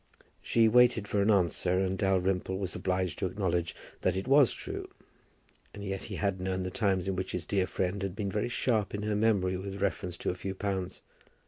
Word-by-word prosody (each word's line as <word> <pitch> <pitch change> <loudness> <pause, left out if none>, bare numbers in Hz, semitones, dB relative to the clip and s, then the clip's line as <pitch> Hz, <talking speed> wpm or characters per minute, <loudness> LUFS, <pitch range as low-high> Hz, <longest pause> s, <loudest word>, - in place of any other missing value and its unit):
She 115 -1 +3
waited 120 -2 +5
for 100 0 +1
an 100 - +2
answer 90 -2 +2
and 95 0 +1
Dalrymple 95 -1 +1
was 95 -2 -2
obliged 90 -2 -1
to - - 0
acknowledge 90 -3 -1 0.3
that 95 - +1
it 95 +5 -3
was 135 -1 +6
true. - - -6 0.9
And 100 - -7
yet 95 -1 -4
he - - -6
had 100 -2 -1
known 95 0 -1
the 90 - -4
times 95 -6 0
in 95 - 0
which 95 0 -3
his 85 -3 -3
dear 95 -2 +1
friend 95 +2 -2
had 95 -1 -3
been 100 -2 -2
very 105 +4 -1
sharp 110 -5 0
in 105 - -4
her 105 0 0
memory 100 -4 +2
with 100 +1 -6
reference 90 -3 -2
to - - -1
a - - -3
few 95 +1 -5
pounds. 95 -2 -3
95 Hz, 210 wpm, -30 LUFS, 95-105 Hz, 0.9 s, was